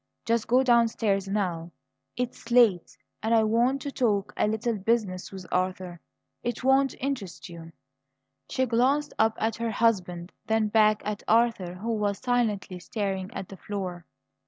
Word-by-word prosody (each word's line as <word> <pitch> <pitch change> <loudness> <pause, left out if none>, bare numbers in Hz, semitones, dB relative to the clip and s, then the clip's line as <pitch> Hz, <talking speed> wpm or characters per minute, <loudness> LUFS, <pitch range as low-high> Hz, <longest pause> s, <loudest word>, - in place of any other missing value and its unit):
Just 230 -1 0
go 255 +2 +4
downstairs 230 -5 +2
now; 180 -5 -2 0.5
it's 245 -1 -4
late, 230 -8 +3 0.2
and 225 +2 +2
I 220 - +5
want 240 +5 +2
to 285 - -4
talk 210 -7 0
a - - +1
little 220 +2 -1
business 200 -3 -1
with 190 -2 -8
Arthur. 185 -1 -2 0.4
It 240 +1 -4
won't 270 0 +3
interest 245 -11 -4
you." 165 -1 -10 0.8
She 260 - +1
glanced 260 +5 +1
up 220 0 +3
at 225 0 -1
her 230 0 -2
husband; 185 -6 0 0.2
then 220 -1 +1
back 215 0 +3
at 210 0 -3
Arthur, 225 -6 +2
who 225 +5 -3
was 205 -2 0
silently 220 -7 -1
staring 195 -1 -3
at 190 - -5
the 195 - -10
floor. 185 -4 -5
215 Hz, 155 wpm, -27 LUFS, 190-235 Hz, 0.8 s, I